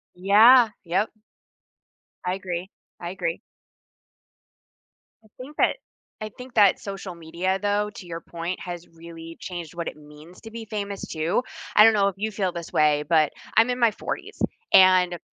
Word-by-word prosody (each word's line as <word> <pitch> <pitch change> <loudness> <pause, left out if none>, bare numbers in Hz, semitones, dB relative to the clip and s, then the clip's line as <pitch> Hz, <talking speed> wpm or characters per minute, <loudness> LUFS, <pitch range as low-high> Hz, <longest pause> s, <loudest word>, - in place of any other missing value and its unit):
Yeah, 220 +6 +6
yep. 190 +6 0 1.1
I 180 +1 0
agree, 185 0 -5 0.3
I 175 0 -5
agree. 175 -3 -3 1.8
I - - -21
think 275 +4 -10
that - - +3 0.5
I 215 - -3
think 250 0 -10
that 205 -4 +5
social 195 -2 -7
media, 170 +3 -2
though, 205 0 +1
to 180 - -10
your 165 -1 -6
point, 170 +2 -5
has 175 -1 -7
really 165 0 -11
changed 175 -2 -7
what 170 -1 -4
it - - -8
means 150 +4 -15
to 225 - -10
be 225 0 -8
famous 205 -2 -5
too. 160 +9 -1 0.3
I 210 - +8
don't 225 - +6
know 200 -1 +3
if 195 - -4
you 220 +1 -2
feel 190 -3 -2
this 170 -1 -7
way, 150 -1 +3
but 160 -2 +3 0.2
I'm 225 +3 +5
in 245 - -2
my 235 -2 +4
40s, - - -6 0.4
and 185 -2 +6
185 Hz, 165 wpm, -24 LUFS, 170-210 Hz, 1.8 s, I